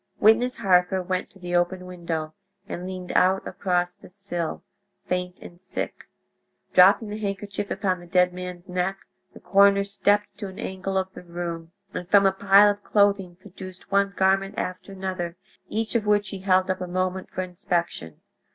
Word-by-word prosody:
Witness 240 +4 +4
Harker 185 -2 +3
went 185 0 -2
to - - -19
the 175 -1 -4
open 180 +1 0
window 170 -3 -4 0.3
and 180 0 -5
leaned 185 -1 -6
out 190 +1 +3
across 180 -2 0
the - - -16
sill, 175 - -4 0.4
faint 180 0 -2
and 175 +1 -13
sick. 190 - -5 0.7
Dropping 195 +4 +6
the 210 +1 -5
handkerchief 200 -1 -4
upon 190 -2 -1
the 175 - -13
dead 180 0 +3
man's 180 0 -7
neck, 180 +1 -1 0.4
the - - -11
coroner 200 +2 +5
stepped 205 +1 +1
to 205 - -4
an 190 0 -10
angle 190 +1 -3
of 190 0 -2
the - - -9
room, 170 -1 -6 0.2
and 180 - -5
from 200 0 +6
a 195 - +5
pile 200 +2 +6
of 205 0 -8
clothing 200 -3 +2
produced 185 0 -12
one 200 0 +2
garment 195 +1 +2
after 185 +2 -4
another, 185 -3 -4 0.3
each 225 0 -2
of 220 -3 0
which 205 -1 +2
he 195 - -6
held 185 -1 +2
up 185 - -4
a 180 - -3
moment 185 +1 -2
for 185 - -3
inspection. 175 - -3
185 Hz, 175 wpm, -25 LUFS, 180-200 Hz, 0.7 s, Dropping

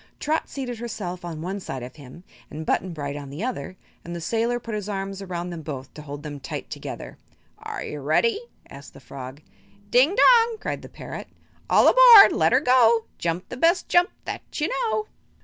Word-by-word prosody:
Trot 310 +2 -1
seated 250 -4 -5
herself 185 -6 -5
on 165 -2 -6
one 190 +3 -4
side 135 -9 -6
of 125 +1 -9
him 145 +4 -13 0.3
and 155 +2 -7
Button 185 +3 0
Bright 145 -3 -5
on 145 -2 -7
the 145 +9 -6
other, 240 -6 -4 0.3
and 170 +1 -7
the - - -5
sailor 230 +7 -1
put 230 -2 -7
his 210 -1 -4
arms 195 -1 -4
around 180 -2 -5
them 170 -2 -6
both 140 -3 -7
to 150 - -10
hold 145 0 -8
them 145 -2 -7
tight 135 - -7
together. - - -8 0.4
"Are - - -6
you 150 - -6
ready?" 415 - +1 0.3
asked 140 +1 -13
the - - -12
frog. 130 +2 -10 0.5
"Ding 270 +10 +4
dong!" 465 -1 +5
cried - - -4
the - - -11
parrot; - - -8 0.4
"All - - +5
aboard! 485 -5 +9
let - - +2
'er - - +4
go! 235 -3 +4
Jump 170 +2 -3
the 245 - -7
best 335 +6 +2
jump 350 +1 +4 0.2
that - - -5 0.2
you 305 +4 0
know." 440 -3 -1
190 Hz, 200 wpm, -24 LUFS, 150-255 Hz, 0.5 s, aboard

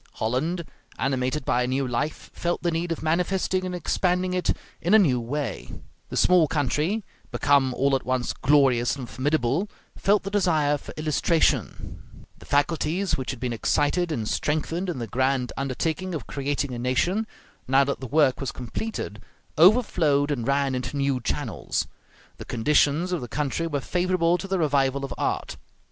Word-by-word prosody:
Holland, 155 +10 -1 0.3
animated 130 +1 -1
by 125 - +2
a 125 - 0
new 130 +1 0
life, 130 +6 -3
felt 175 0 -2
the 175 - +1
need 165 +1 -2
of 165 - -3
manifesting 185 +3 0
and 180 - -4
expanding 180 +1 0
it 180 -1 +1 0.3
in 180 +6 +4
a 210 -3 +7
new 125 -5 +2
way; 125 -1 -4 0.4
the - - -4
small 180 -3 +5
country, 155 - 0 0.3
become 140 -2 +3
all 135 +1 +2
at 130 - -2
once 130 -1 -1
glorious 130 -4 +3
and 130 -4 -7
formidable, 145 - 0 0.3
felt 205 +1 +2
the 195 - -5
desire 155 -7 +2
for - - -10
illustration; 155 +2 -1
the - - -16
faculties 165 +5 +1
which 130 - -5
had 130 - -4
been 120 0 -2
excited 160 +9 +1
and 115 -8 -2
strengthened 165 - -1
in 170 - -3
the 120 - -3
grand 130 +1 0
undertaking 160 +7 -2
of 135 -7 -5
creating 140 -1 -2
a 120 - -4
nation, 175 - 0 0.4
now 135 +2 +5
that 140 0 -2
the 130 - -6
work 145 -1 +3
was 135 - -2
completed, 125 - -5 0.3
overflowed 160 - +4
and 120 -5 -2
ran 140 -1 +1
into 130 +3 -3
new 140 -2 +1
channels. - - -2 0.5
The - - -8
conditions 150 +7 +2
of 180 - -1
the 120 - -5
country 150 +5 -2
were 145 -4 -2
favorable 180 +1 +1
to 195 - -5
the 195 0 0
revival 140 -4 +1
of - - -6
art. - - -2
145 Hz, 170 wpm, -25 LUFS, 130-175 Hz, 0.5 s, a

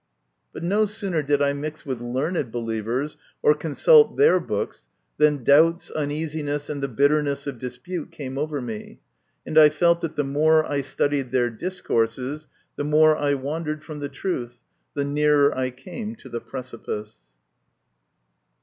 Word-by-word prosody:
But - - -8
no 205 +5 +2
sooner 195 -6 -2
did 145 0 +1
I 140 0 +2
mix 150 +2 -6
with 130 -4 -4
learned 130 +3 -2
believers, 115 +5 -3 0.3
or 150 - +6
consult 165 - +4
their 440 +3 +5
books, - - -4 0.3
than 150 -3 +3
doubts, 165 +6 +4
uneasiness, 150 -1 -3
and 145 -1 -4
the 140 - 0
bitterness 140 +2 +1
of 140 -4 -5
dispute 130 +8 -6
came 140 -5 -7
over 145 0 -2
me, 110 -3 -7 0.5
and 155 - +4
I 155 -1 +9
felt 170 +3 +2
that 165 - -4
the 145 - +1
more 155 +3 +3
I 145 -1 -1
studied 140 -1 -1
their 120 -2 +1
discourses 130 -1 -2 0.3
the - - -2
more 155 +1 +5
I 145 -1 +1
wandered 150 +3 -4
from 155 -2 -8
the 145 -1 -4
truth, 125 -11 -4 0.4
the 140 -1 0
nearer 145 0 +3
I 130 0 -1
came 210 - -7
to - - -14
the 120 - -4
precipice. 115 -4 -7
145 Hz, 155 wpm, -24 LUFS, 130-155 Hz, 0.5 s, I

